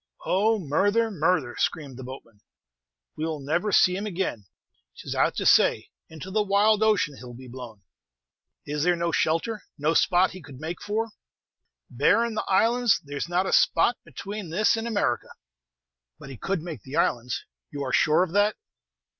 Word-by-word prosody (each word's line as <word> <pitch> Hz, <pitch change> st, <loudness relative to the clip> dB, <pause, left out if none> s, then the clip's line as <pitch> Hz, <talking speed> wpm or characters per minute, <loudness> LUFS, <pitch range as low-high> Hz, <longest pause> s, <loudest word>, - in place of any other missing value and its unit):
"Oh, 215 Hz, +4 st, +2 dB
murther! 205 Hz, +7 st, +1 dB
murther!" 160 Hz, -7 st, 0 dB
screamed 145 Hz, -6 st, -2 dB
the 130 Hz, -, -9 dB
boatman; 120 Hz, -5 st, -11 dB, 0.7 s
"we 155 Hz, -, -5 dB
'll 160 Hz, -2 st, -2 dB
never 165 Hz, +9 st, -1 dB
see 180 Hz, -1 st, +4 dB
him 200 Hz, +3 st, -3 dB
again. 170 Hz, -, -3 dB, 0.5 s
'T -, -, -12 dB
is -, -, -2 dB
out -, -, +1 dB
to -, -, -3 dB
say, -, -, +4 dB, 0.2 s
into 160 Hz, +4 st, -9 dB
the 215 Hz, +2 st, +2 dB
wild 205 Hz, +1 st, +3 dB
ocean, 205 Hz, -9 st, +2 dB
he'll 120 Hz, -1 st, -10 dB
be 130 Hz, +1 st, -11 dB
blown!" 120 Hz, -5 st, -10 dB, 0.8 s
"Is 150 Hz, 0 st, -3 dB
there 175 Hz, +2 st, +3 dB
no 170 Hz, 0 st, -1 dB
shelter, 165 Hz, +9 st, 0 dB, 0.2 s
no 150 Hz, +3 st, +1 dB
spot 180 Hz, +2 st, +3 dB
he 185 Hz, -, -10 dB
could 135 Hz, -3 st, -12 dB
make 165 Hz, +3 st, -6 dB
for?" 220 Hz, +2 st, -2 dB, 0.8 s
"Barrin' 205 Hz, -, +2 dB
the 215 Hz, -, -3 dB
islands, 230 Hz, +4 st, +3 dB
there's 145 Hz, +2 st, -5 dB
not 180 Hz, +2 st, +1 dB
a -, -, -2 dB
spot -, -, +4 dB
between 200 Hz, -2 st, -7 dB
this 210 Hz, +8 st, +2 dB
and 225 Hz, +1 st, -3 dB
America." 205 Hz, -, -1 dB, 0.9 s
"But 135 Hz, -, -11 dB
he -, -, -8 dB
could 190 Hz, -, -2 dB
make 160 Hz, -9 st, -7 dB
the 130 Hz, +7 st, -9 dB
islands, 120 Hz, -3 st, 0 dB, 0.2 s
you 140 Hz, -1 st, -5 dB
are 130 Hz, -, -4 dB
sure 155 Hz, +3 st, +4 dB
of 185 Hz, -, -4 dB
that?" 205 Hz, +1 st, +3 dB
175 Hz, 175 wpm, -25 LUFS, 140-205 Hz, 0.9 s, see